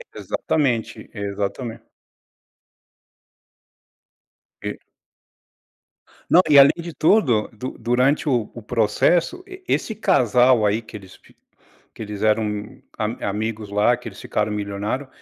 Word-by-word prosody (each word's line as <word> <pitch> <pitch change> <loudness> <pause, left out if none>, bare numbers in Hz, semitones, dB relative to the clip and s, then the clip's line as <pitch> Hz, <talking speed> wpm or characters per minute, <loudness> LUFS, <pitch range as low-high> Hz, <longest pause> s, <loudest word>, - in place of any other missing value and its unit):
Exatamente, 125 -7 -2
exatamente. 100 +3 -4 2.8
E - - -5 1.5
Não, 180 - +7
e 145 - +6
além 140 0 +9
de 170 0 -7
tudo, 145 - +2
du 125 +4 -7
durante 130 +5 +1
o 120 -5 0
o 120 - -9
processo 160 - +1
e 375 -1 -11
esse 220 - 0
casal 125 - +3
aí 105 +3 +1
que 110 -1 -10
eles 95 -2 -15 0.8
que - - -8
eles 105 -1 -6
eram 105 -1 -1 0.2
a 110 -1 -3
amigos 105 0 -4
lá, 105 +4 +3
que 120 -1 -9
eles 100 - -12
ficaram 105 0 -2
milionário, 105 +6 -3
115 Hz, 115 wpm, -22 LUFS, 105-135 Hz, 2.8 s, além